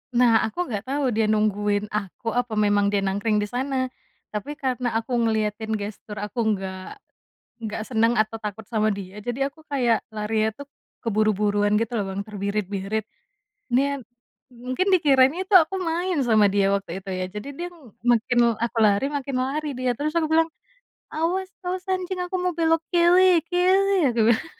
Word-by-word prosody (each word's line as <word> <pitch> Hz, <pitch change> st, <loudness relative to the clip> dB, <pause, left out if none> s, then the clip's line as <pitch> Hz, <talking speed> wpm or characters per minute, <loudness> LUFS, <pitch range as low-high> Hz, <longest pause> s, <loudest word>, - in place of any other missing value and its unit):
Nah, 235 Hz, -2 st, +5 dB
aku 220 Hz, -, -11 dB
enggak 215 Hz, +1 st, -4 dB
tau 275 Hz, -2 st, 0 dB
dia 220 Hz, 0 st, +1 dB
nungguin 210 Hz, -1 st, +1 dB
aku 210 Hz, +2 st, -3 dB
apa 245 Hz, -2 st, -1 dB
memang 205 Hz, -1 st, +3 dB
dia 200 Hz, -1 st, +1 dB
nangkring 205 Hz, +2 st, 0 dB
di -, -, -3 dB
sana. 260 Hz, +1 st, -2 dB, 0.4 s
Tapi 220 Hz, +8 st, -4 dB
karena 255 Hz, -4 st, -2 dB
aku 225 Hz, +3 st, -2 dB
ngeliatin 220 Hz, -1 st, 0 dB
gestur 210 Hz, 0 st, -6 dB
aku 210 Hz, +4 st, -5 dB
enggak, 190 Hz, -, -3 dB, 0.7 s
enggak 215 Hz, 0 st, -4 dB
senang 230 Hz, -1 st, +2 dB
atau 215 Hz, +1 st, +1 dB
takut 210 Hz, 0 st, -6 dB
sama 215 Hz, -2 st, +1 dB
dia. 200 Hz, +1 st, -6 dB
Jadi 245 Hz, +3 st, -4 dB
aku 315 Hz, +3 st, -10 dB
kayak 245 Hz, -5 st, +2 dB
larinya 215 Hz, 0 st, 0 dB
tuh, -, -, -13 dB, 0.4 s
keburu 215 Hz, -1 st, +2 dB
buruan 205 Hz, 0 st, +2 dB
gitu 230 Hz, +1 st, -2 dB
loh, 205 Hz, -3 st, 0 dB
Bang, 195 Hz, +1 st, -3 dB
terbirit 200 Hz, -1 st, -2 dB
birit. 200 Hz, +2 st, -3 dB, 0.6 s
Niat 275 Hz, +3 st, +1 dB, 0.5 s
mungkin 255 Hz, +9 st, -3 dB
dikiranya 305 Hz, -1 st, +4 dB
tu 400 Hz, -, -13 dB
aku 355 Hz, +4 st, -1 dB
main 350 Hz, 0 st, -1 dB
sama 215 Hz, -3 st, +4 dB
dia 195 Hz, 0 st, +2 dB
waktu 190 Hz, -1 st, -3 dB
itu 195 Hz, -, -6 dB
ya 185 Hz, 0 st, -2 dB
jadi 210 Hz, +7 st, -7 dB
dia 345 Hz, +5 st, -5 dB
m 305 Hz, -, -17 dB
makin 240 Hz, 0 st, +2 dB
l -, -, +3 dB
aku 235 Hz, -1 st, -3 dB
lari 205 Hz, +2 st, +4 dB
makin 275 Hz, -1 st, -3 dB
lari 300 Hz, +3 st, -2 dB
dia. 255 Hz, -1 st, 0 dB
Terus 300 Hz, +5 st, -3 dB
aku 330 Hz, -, +3 dB
bilang, 325 Hz, 0 st, +4 dB, 0.6 s
"Awas 370 Hz, +4 st, -1 dB
awas 365 Hz, 0 st, -4 dB
anjing 370 Hz, 0 st, -2 dB
aku 370 Hz, +1 st, -3 dB
mau 360 Hz, -2 st, -1 dB
belok 325 Hz, -1 st, +2 dB
kili, 350 Hz, -1 st, +5 dB
kili," 370 Hz, +3 st, +3 dB, 0.2 s
aku 235 Hz, -1 st, 0 dB
bilang. 230 Hz, -, -2 dB
230 Hz, 175 wpm, -24 LUFS, 210-295 Hz, 0.7 s, Nah